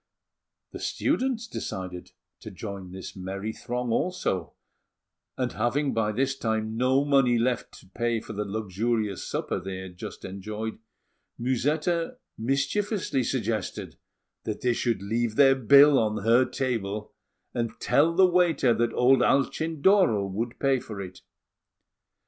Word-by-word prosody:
The - - -8
students 250 -3 -1
decided 90 - -6 0.3
to - - -9
join 100 -1 -7
this 95 +1 -8
merry 95 +3 -5
throng 125 +1 -3
also; 105 - -1 0.8
and, 125 -1 -1
having 135 +3 0
by 110 -1 +1
this 135 +5 0
time 110 -3 -2
no 130 +4 +2
money 135 -4 +4
left 120 +1 -1
to - - -20
pay 120 +3 -1
for 110 - -9
the 105 0 -2
luxurious 105 0 -2
supper - - -2
they 95 0 -6
had 95 -1 -9
just - - -7
enjoyed, 105 +4 -5 0.6
Musetta 150 - 0 0.2
mischievously 140 - 0
suggested - - -3 0.5
that 110 - -4
they 125 -1 +2
should 115 -4 -1
leave 115 +2 -1
their 135 0 +7
bill 140 +2 +6
on 110 -2 -1
her 120 +3 +5
table, 110 -6 -3 0.4
and 115 -1 -3
tell 165 +4 +3
the 190 +1 +7
waiter 175 -8 +3
that 115 0 0
old 130 +2 +5
Alcindoro 160 - +3
would 110 +5 -4
pay 135 -2 +2
for 105 -4 -8
it. 95 -2 -8
120 Hz, 135 wpm, -27 LUFS, 105-135 Hz, 0.8 s, their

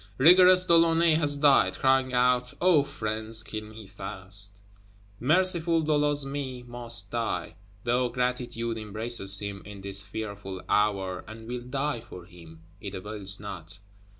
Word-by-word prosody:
Rigorous 180 +4 +6
De 170 - +4
Launay 165 0 +3
has 145 -2 +1
died; 140 -1 +3
crying 130 -1 +2
out, 125 0 +1
"O 175 -4 +4
friends, 110 -3 -4
kill 110 -1 -7
me 110 0 -12
fast!" 100 +1 -6 0.6
Merciful 170 +3 +2
De 155 - -1
Losme 140 -3 -2
must 115 -4 -3
die; 115 -7 -3 0.3
though 125 +1 0
Gratitude 120 -2 -3
embraces 110 -2 +5
him, 100 -1 -5
in 100 -1 -11
this 100 0 +2
fearful 100 -2 -7
hour, 95 -3 0
and 110 +1 -11
will 125 0 -5
die 135 +1 -3
for 90 -7 -12
him, 80 -2 -16 0.2
it 100 0 -8
avails 100 0 -2
not. 95 -4 -9
115 Hz, 140 wpm, -26 LUFS, 100-135 Hz, 0.6 s, Rigorous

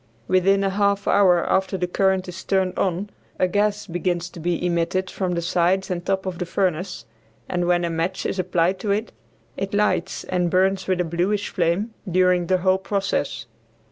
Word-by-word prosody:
Within 195 +2 +3
a 195 - +1
half 200 0 +1
hour 180 -4 +4
after 190 0 +1
the 180 - 0
current 190 +1 +1
is 180 +1 -7
turned 190 -1 0
on 195 +2 -1 0.3
a 185 - +2
gas 205 +2 0
begins 175 -1 -2
to - - -10
be 175 +1 -1
emitted 175 +2 0
from 185 -2 -2
the 170 - -2
sides 185 +2 +1
and 175 -1 -2
top 190 +1 -1
of 185 -2 -4
the 180 - -2
furnace, 185 0 -1 0.4
and 175 -1 -1
when 175 -1 +2
a - - -1
match 165 +3 -2
is 190 - -2
applied 180 0 +1
to 205 - -4
it, 210 +3 0 0.5
it 195 +1 -3
lights 205 -3 0
and 180 -1 0
burns 190 +2 +1
with 185 -1 +1
a - - -1
bluish 180 +5 -1
flame 185 +5 0 0.2
during 180 -1 +3
the 185 - +3
whole 185 +1 +2
process. 190 - -2
185 Hz, 190 wpm, -23 LUFS, 175-195 Hz, 0.5 s, hour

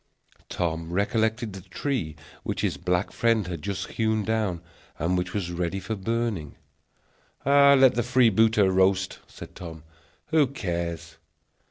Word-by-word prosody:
Tom 85 -1 -2
recollected 110 +3 0
the 95 - -8
tree 95 - -3 0.3
which - - -3
his - - 0
black 90 +2 -1
friend 115 -3 +1
had 90 -1 -5
just 95 -2 -3
hewn 110 -1 0
down, 105 -5 -1 0.4
and 85 +4 0
which 90 0 -1
was 95 -4 -3
ready 90 +2 -2
for 110 - -4
burning. 105 -6 -2 0.9
"Let 140 -1 +6
the 120 - 0
freebooter 115 -4 +4
roast," 95 0 +2
said - - -11
Tom; 80 -3 -9 0.5
"who 155 -3 +4
cares!" 85 - -4
100 Hz, 135 wpm, -26 LUFS, 90-115 Hz, 0.9 s, Let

